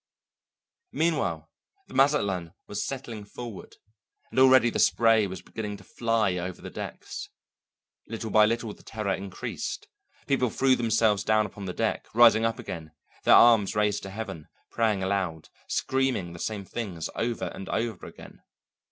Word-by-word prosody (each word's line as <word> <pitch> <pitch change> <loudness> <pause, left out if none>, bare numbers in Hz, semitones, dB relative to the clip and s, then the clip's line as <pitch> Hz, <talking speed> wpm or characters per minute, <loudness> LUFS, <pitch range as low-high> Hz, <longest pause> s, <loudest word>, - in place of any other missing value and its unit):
Meanwhile 135 - 0 0.4
the - - -15
Mazatlan 100 - +2
was 105 0 -3
settling 120 -6 -6
forward, 110 0 -9 0.6
and - - 0
already 130 -3 +6
the - - -2
spray 115 -3 +4
was 95 0 -8
beginning 105 -2 -5
to 100 - -16
fly 110 -3 0
over 90 +1 -5
the - - -9
decks. - - -7 0.8
Little 115 0 -5
by 105 0 +6
little 115 -1 -2
the - - -18
terror 105 -3 -3
increased; 95 -1 -5 0.4
people 130 -3 +1
threw 130 +3 +3
themselves 110 -4 +2
down 110 +1 +3
upon 100 -1 -8
the 90 - -3
deck, - - -1
rising 115 -1 +7
up 115 - 0
again, 80 -3 -7 0.3
their - - +8
arms 115 -5 +6
raised 105 -1 +1
to 95 - -7
heaven, 95 -6 -6 0.2
praying 110 -4 +1
aloud, 95 -5 -2 0.2
screaming 130 -10 0
the 85 - -10
same 105 0 -3
things 95 -7 -4
over 115 0 -2
and 95 - -8
over 115 0 -2
again. - - -13
110 Hz, 150 wpm, -27 LUFS, 95-115 Hz, 0.8 s, their